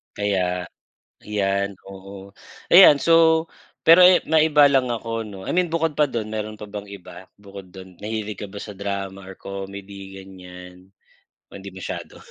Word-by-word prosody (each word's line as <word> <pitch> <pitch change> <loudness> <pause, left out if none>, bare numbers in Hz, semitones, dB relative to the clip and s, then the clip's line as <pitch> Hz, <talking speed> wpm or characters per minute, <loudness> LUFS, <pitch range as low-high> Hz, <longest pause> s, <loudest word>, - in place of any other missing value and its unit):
Kaya 90 -3 -1 0.6
yan, 100 -1 -2
oo. 95 0 -12 0.4
Ayan, 175 -5 +9
so 160 +1 +3 0.4
pero, 165 +2 +7
eh, 180 0 +7
maiba 155 -2 +4
lang 130 -2 +2
ako 115 0 -5
'no, 100 - -10
I - - -5
mean 180 0 +1
bukod 165 -1 -1
pa 150 - +4
dun 110 -3 -5
meron 110 0 -5
pa 105 - -9
bang 105 0 -7
iba, 95 -2 -12
bukod 100 -2 -13
dun, 95 -2 -13
nahilig 105 -1 -5
ka 105 - -5
ba 100 - -13
sa 105 - -8
drama 100 -1 -5
or 95 - -10
comedy 100 0 -9
ganyan 90 -1 -14 0.6
o - - -21
hindi 100 0 -9
masyado. 95 0 -8
100 Hz, 160 wpm, -22 LUFS, 95-115 Hz, 0.6 s, Ayan